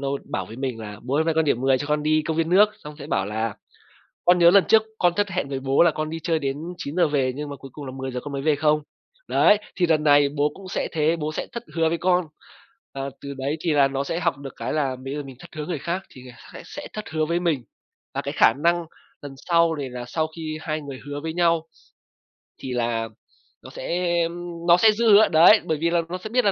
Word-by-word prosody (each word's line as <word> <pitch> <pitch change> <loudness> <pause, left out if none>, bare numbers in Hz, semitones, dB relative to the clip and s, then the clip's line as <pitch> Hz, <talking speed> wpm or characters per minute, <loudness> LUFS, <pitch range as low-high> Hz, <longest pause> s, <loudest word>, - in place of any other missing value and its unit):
nó 140 - -2 0.2
bảo 95 - -2
với 115 - -10
mình 130 -4 -4
là 105 -1 -7
"Bố 130 +3 -3
ơi, - - +2
hôm 160 - 0
nay 165 - +1
con 160 0 +2
điểm 125 -5 +1
10, 135 -1 +3
cho 145 - -4
con 150 0 0
đi 155 0 +2
công 160 +1 -3
viên 165 0 +1
nước." 200 +4 +6 0.2
Xong 150 0 -8
sẽ 145 - -8
bảo 95 -8 0
là 110 0 -3 0.7
"Con 180 0 +5
nhớ 170 0 +7
lần 195 +1 +6
trước 220 -1 +6 0.2
con 175 -1 +3
thất 205 +1 +1
hẹn 180 -5 -2
với 135 -1 -3
bố 135 +3 +3
là 170 - +5
con 155 0 -4
đi 165 - -4
chơi 165 -1 +1
đến 135 -1 -2 0.2
9:00 160 +3 0
về 135 -3 +1
nhưng 150 0 -5
mà 140 - -6
cuối 135 0 -12
cùng 145 - -8
là 130 - -6
10:00 130 -1 -4
con 145 - -8
mới 135 -1 -3
về 155 -1 +2
không? 150 +1 +2 0.5
Đấy, 210 - +5 0.2
thì 180 - +2
lần 155 -2 +2
này 145 -1 +5
bố 145 +1 0
cũng 195 -1 -11
sẽ - - -2
thế, 160 +1 +1
bố 155 -1 -3
sẽ - - -4
thất 235 - -5
hứa 165 -1 +3
với 170 - -1
con." 180 0 +2 0.7
Là 135 0 -4
từ 140 0 -7
đấy 140 +3 -2
thì 170 - 0
là 140 -2 +4
nó 135 0 -2
sẽ 165 +4 -3
học 160 -5 0
được 135 -2 -9
cái - - -4
là 140 -4 0
bây 135 +2 -6
giờ 145 - -3
mình 135 -2 -11
thất 175 - -12
hứa 150 -1 -4
người 170 -4 -3
khác 175 +6 -3
thì 130 - -13 0.3
sẽ - - -8
sẽ - - -8
thất 215 - -7
hứa 155 0 0
với 170 +2 0
mình. 160 -8 0 0.5
Và - - -1
cái - - -4
khả - - +6
năng 170 0 +2 0.4
lần 140 -1 -8
sau 170 +2 +2
này 140 -3 -5
là 125 0 -6
sau 155 +5 -1
khi 155 -1 -5
hai 155 -1 -3
người 140 -3 -8
hứa 145 0 -5
với 160 +1 -4
nhau 165 -1 +2 0.9
thì 130 - -6
là 115 -2 -1 0.5
nó - - -10
sẽ, 175 0 -2
ưm, 170 0 -6
nó 170 0 +7
sẽ 215 +4 +6
giữ 220 0 +2
hứa. 210 +2 +7
Đấy, 170 +7 +7
bởi 160 -1 0
vì 165 +3 0
là 170 0 +2
nó 180 - -3
sẽ 200 +4 -8
biết 250 +1 +1
là 200 - +4
155 Hz, 270 wpm, -23 LUFS, 135-170 Hz, 0.9 s, nhớ